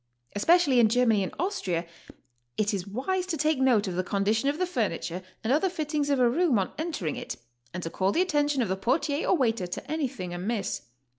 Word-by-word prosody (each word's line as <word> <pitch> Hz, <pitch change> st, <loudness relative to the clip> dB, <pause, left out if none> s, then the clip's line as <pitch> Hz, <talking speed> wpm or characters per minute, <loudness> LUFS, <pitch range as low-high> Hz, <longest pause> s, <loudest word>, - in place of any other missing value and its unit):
Especially 290 Hz, -, +4 dB
in 225 Hz, -2 st, +5 dB
Germany 230 Hz, -3 st, +3 dB
and 190 Hz, -, -2 dB
Austria 185 Hz, -, -1 dB, 0.7 s
is 215 Hz, 0 st, +1 dB
it 190 Hz, -2 st, -3 dB
wise 360 Hz, -, -2 dB
to 335 Hz, -4 st, -2 dB
take 305 Hz, -1 st, +1 dB
note 240 Hz, -6 st, +3 dB
of 185 Hz, -, -2 dB
the 185 Hz, -, 0 dB
condition 210 Hz, +7 st, +1 dB
of 290 Hz, -, -1 dB
the 365 Hz, -, +1 dB
furniture 200 Hz, -, -2 dB, 0.2 s
and 230 Hz, +4 st, +2 dB
other 320 Hz, +6 st, +2 dB
fittings 300 Hz, -4 st, -2 dB
of 280 Hz, -, +3 dB
a 245 Hz, -, +5 dB
room 290 Hz, 0 st, +2 dB
on 190 Hz, -, -1 dB
entering 305 Hz, -, -2 dB
it, -, -, -5 dB, 0.4 s
and 180 Hz, -, -5 dB
to 165 Hz, -, -4 dB
call 190 Hz, +1 st, +1 dB
the 340 Hz, -, +2 dB
atten 295 Hz, -5 st, +1 dB
tion 285 Hz, -3 st, 0 dB
of -, -, -2 dB
the 190 Hz, -, +1 dB
portier 285 Hz, -, 0 dB
or 370 Hz, -, +4 dB
waiter 225 Hz, -, +1 dB
to 260 Hz, +10 st, -6 dB
anything 265 Hz, -, -3 dB
amiss. 185 Hz, -, -2 dB
245 Hz, 215 wpm, -27 LUFS, 195-300 Hz, 0.7 s, in